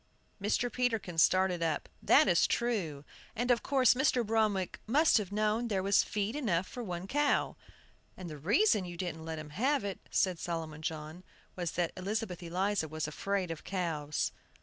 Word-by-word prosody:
Mr. 230 +4 0
Peterkin 225 -9 -1
started 185 0 +3
up. 160 -3 -1
"That - - +5
is 175 -3 +4
true; 180 -12 -1 0.3
and 245 +2 +1
of 235 -1 +3
course 265 -3 +4
Mr. 250 -2 +2
Bromwick 210 -4 0
must 290 +2 +4
have 200 -3 -5
known 215 +3 +1
there 195 -4 -1
was 200 0 +4
feed 210 +3 -2
enough 190 - 0
for 250 - -7
one 180 -5 -5
cow." 290 +7 +1 0.6
"And 185 - -7
the 155 -3 -8
reason 210 - +3
you 175 -1 -7
didn't 170 -3 -4
let 160 -1 -4
him 155 -1 -8
have 265 - +1
it," 200 -2 -4
said 185 -3 +1
Solomon 160 -3 -4
John, 155 +2 -5 0.3
"was 175 -3 -3
that 175 -1 0
Elizabeth 195 -1 -3
Eliza 180 +1 -1
was 155 0 -3
afraid 185 +3 -2
of 165 - -7
cows." 160 -6 -2
190 Hz, 170 wpm, -32 LUFS, 165-225 Hz, 0.6 s, That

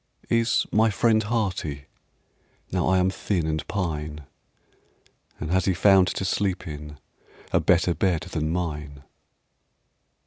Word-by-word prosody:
"Is 115 0 +2
my 110 +1 +4
friend 110 +1 +3
hearty, 95 - -2 0.9
Now 90 -1 0
I 95 +1 +3
am 90 +1 +2
thin 95 -3 -1
and 80 -1 -1
pine, 75 -6 -3 1.2
And 80 +2 -4
has 95 0 +2
he 95 - +1
found 95 0 +5
to 95 - -2
sleep 95 -1 -1
in 75 -1 -8 0.5
A - - +3
better 90 0 +3
bed 85 0 +1
than 80 -2 -3
mine?" 75 -5 -4
90 Hz, 130 wpm, -25 LUFS, 75-95 Hz, 1.2 s, found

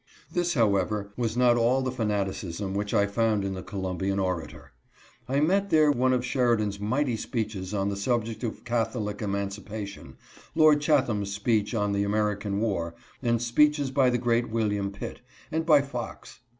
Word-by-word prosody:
ThiSj. 175 -1 0
however, 100 -2 +1
was 115 -1 -2
not 125 -1 +5
all 125 +3 +2
the 130 - -1
fanaticism 100 -4 -2
which 100 +1 -2
I 100 - +3
found 105 0 +1
in 95 - -2
the 95 - -5
Columbian 95 0 -3
Orator. 90 -6 -3 0.6
I 135 +2 +2
met 195 +5 +2
therejme 145 -6 +4
of 125 -1 +1
Sheridan's 115 -6 +1
mighty 125 +5 0
speeches^ 105 -4 -3
on 100 +1 0
the 100 - -2
subject 115 +2 -1
of 115 - -4
Catholic 115 -3 -2
Emancipation, 100 0 -5 0.4
Lord 155 -2 +5
Chatham's 125 -10 +1
speech 105 +2 0
on 105 -2 +1
the 100 0 +1
American 105 -1 0
War, 85 -7 -1 0.3
and 120 -2 +1
speeches 145 +4 +2
by 135 -1 +4
the 120 - +1
great 120 0 +1
William 105 -3 0
Pitt, 115 +5 -7 0.3
and 160 +1 -1
by 150 -4 +6
Fox. 125 -4 -7
110 Hz, 160 wpm, -27 LUFS, 100-125 Hz, 0.6 s, by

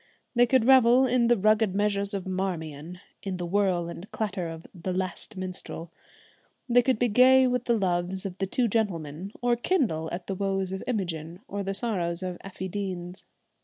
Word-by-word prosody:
They 245 -1 +5
could 255 -1 +3
revel 255 0 +6
in 245 -2 +3
the 240 0 +4
rugged 215 -1 +3
measures 200 0 0
of 195 - -4
'Marmion,' 175 -3 -4 0.2
in 190 -2 -4
the 175 - -3
whirl 185 -2 +1
and 170 +3 -8
clatter 190 -5 -2
of 165 0 -8
the 185 0 -4
'Last 185 +3 -4
Minstrel.' 180 -2 -6 0.8
They 245 0 +5
could 255 -1 +1
be 245 - +2
gay 255 +4 +6
with 250 -1 0
the 235 -1 +2
loves 185 -1 -1
of 185 -2 -4
the 195 - 0
Two 240 +5 +1
Gentlemen, 185 -5 -2
or 245 0 +3
kindle 230 - 0
at 175 +1 -5
the 195 - -3
woes 195 -1 -1
of 190 - -4
Imogen 175 -6 -3
or 200 +1 -4
the 195 0 -2
sorrows 185 -6 -1
of 180 -1 -4
Effie 190 -1 -6
Deans. 185 -2 -5
195 Hz, 185 wpm, -27 LUFS, 180-230 Hz, 0.8 s, revel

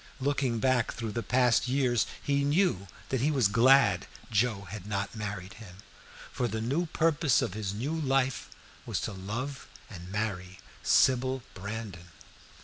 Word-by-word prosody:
Looking 135 -3 0
back 125 0 +1
through 115 -2 -4
the 115 - -2
past 125 +2 +2
years 125 -3 +2
he 140 0 0
knew 145 - +1 0.2
that 130 -3 0
he 145 - +2
was 135 -8 +3
glad 115 -3 +4 0.2
Joe 110 -1 +1
had 105 -2 -7
not 100 -1 -2
married 105 -4 -5
him, 90 -5 -11 0.6
for 125 - -1
the 110 0 -3
new 140 +10 -1
purpose 155 -5 +2
of - - -3
his 105 -2 -3
new 120 +10 -3
life 135 -4 0 0.4
was - - -1
to 110 - -3
love 115 +9 -5 0.2
and 90 -2 -9
marry 95 -3 -3 0.2
Sybil 130 0 +3
Brandon. 100 -3 -7
115 Hz, 150 wpm, -29 LUFS, 100-135 Hz, 0.6 s, glad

